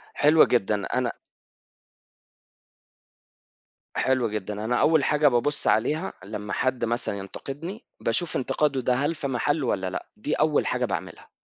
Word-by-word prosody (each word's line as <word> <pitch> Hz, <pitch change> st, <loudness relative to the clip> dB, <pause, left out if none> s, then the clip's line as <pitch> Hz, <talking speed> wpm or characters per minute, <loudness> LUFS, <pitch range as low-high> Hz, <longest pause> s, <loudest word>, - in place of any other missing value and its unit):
حلو 155 Hz, +2 st, +6 dB
جدًا 105 Hz, -4 st, +1 dB
أنا -, -, +1 dB, 2.8 s
حلو 130 Hz, -3 st, +1 dB
جدًا، 105 Hz, 0 st, -4 dB
أنا 120 Hz, +2 st, +1 dB
أول 155 Hz, +2 st, +4 dB
حاجة 150 Hz, +1 st, +3 dB
بابُصّ 140 Hz, +3 st, +1 dB
عليها 155 Hz, -, +1 dB
لمّا 105 Hz, 0 st, -5 dB
حد 130 Hz, -2 st, 0 dB
مثلًا 115 Hz, -3 st, -1 dB
ينتقدني، 145 Hz, -, -7 dB
باشوف 140 Hz, +9 st, 0 dB
انتقاده 135 Hz, +1 st, 0 dB
ده 125 Hz, -, +2 dB
هل 145 Hz, +6 st, 0 dB
في 145 Hz, -, -3 dB
محلّه 140 Hz, +3 st, 0 dB
والّا 95 Hz, -4 st, 0 dB
لأ، 95 Hz, -, -5 dB
دي -, -, -2 dB
أول -, -, +2 dB
حاجة -, -, 0 dB
باعملها. -, -, -5 dB
130 Hz, 135 wpm, -25 LUFS, 110-150 Hz, 2.8 s, حلو